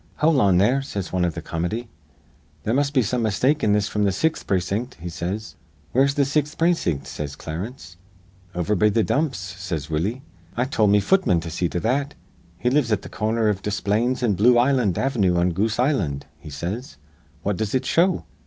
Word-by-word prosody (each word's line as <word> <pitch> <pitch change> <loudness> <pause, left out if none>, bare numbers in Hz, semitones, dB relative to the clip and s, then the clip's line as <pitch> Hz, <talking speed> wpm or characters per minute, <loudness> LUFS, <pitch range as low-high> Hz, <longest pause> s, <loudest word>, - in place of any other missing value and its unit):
'Hol' 150 -3 +3
on 95 -4 +4
there,' 120 +9 +3
says 100 -10 -5
wan 90 -1 +1
iv 85 -3 0
th' - - -6
comity. 90 +9 -3 0.8
'There 110 - 0
must 140 +1 +1
be 130 -4 +3
some 120 +3 -1
mistake 125 +8 +1
in 105 - +3
this 105 0 +2
fr'm 105 -2 -1
th' 100 - +3
sixth 160 +8 0
precin't,' 100 +7 -1
he 85 +2 -6
says. 95 +6 -5 0.3
'Where's 140 +2 +3
the 140 - +3
sixth 145 +2 -1
precin't?' 160 - +1
says 70 0 -6
Clarence. 85 - -7 0.6
'Over 90 +4 0
be 105 +2 +3
th' 110 +1 +2
dumps,' 145 -2 0
says 95 -5 -5
Willie. 100 - -1 0.3
'I 125 - +2
told 110 -6 +2
me 105 0 +4
futman 185 - +3
to 85 0 -6
see 85 +1 -1
to 90 - -2
that. 140 +5 0 0.4
He 125 +6 0
lives 135 -4 +2
at 105 - +1
th' - - -10
cor 110 0 -1
ner 115 -1 +1
iv 100 -2 0
Desplaines 105 +5 0
an' 110 -4 +3
Bloo 120 +6 +5
Island 120 -7 +3
Av'noo 100 -10 +1
on 90 +1 +2
Goose's 105 +6 0
Island,' 120 - 0
he - - -10
says. 90 - -5 0.5
'What 100 -2 -1
does 110 +2 -2
it 130 0 0
show?' 175 +5 +2
105 Hz, 200 wpm, -23 LUFS, 90-130 Hz, 0.8 s, Bloo